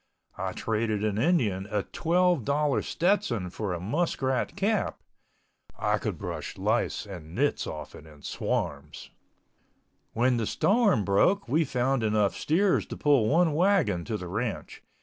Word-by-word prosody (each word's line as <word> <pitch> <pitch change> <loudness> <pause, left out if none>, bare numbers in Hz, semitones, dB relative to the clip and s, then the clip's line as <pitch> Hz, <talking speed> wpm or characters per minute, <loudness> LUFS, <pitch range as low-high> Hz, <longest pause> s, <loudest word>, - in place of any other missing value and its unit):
I 95 0 -2
traded 110 -2 -1
an 105 -1 0
Indian 115 - +1
a 105 -1 -1
$12.00 155 -5 +1
Stetson 155 - 0
for 105 -1 -3
a 90 - -3
muskrat 130 - -1
cap—I 200 +1 -3
could - - -3
brush - - -6
lice 110 +5 0
and 90 -5 -9
nits 145 +3 0
off 75 -2 -7
it 80 - -12
in 75 -2 -16
swarms. 75 +1 -3 1.0
When 125 +1 +2
the 115 -2 -1
storm 200 - +2
broke 140 - +2
we 155 +7 +2
found 130 0 0
enough 105 -2 +2
steers 185 +5 +1
to - - -7
pull 140 -8 +3
one 165 0 +3
wagon 160 - +2
to 110 -1 -2
the 90 - -7
ranch. 105 +5 -4
120 Hz, 140 wpm, -27 LUFS, 100-165 Hz, 1.0 s, pull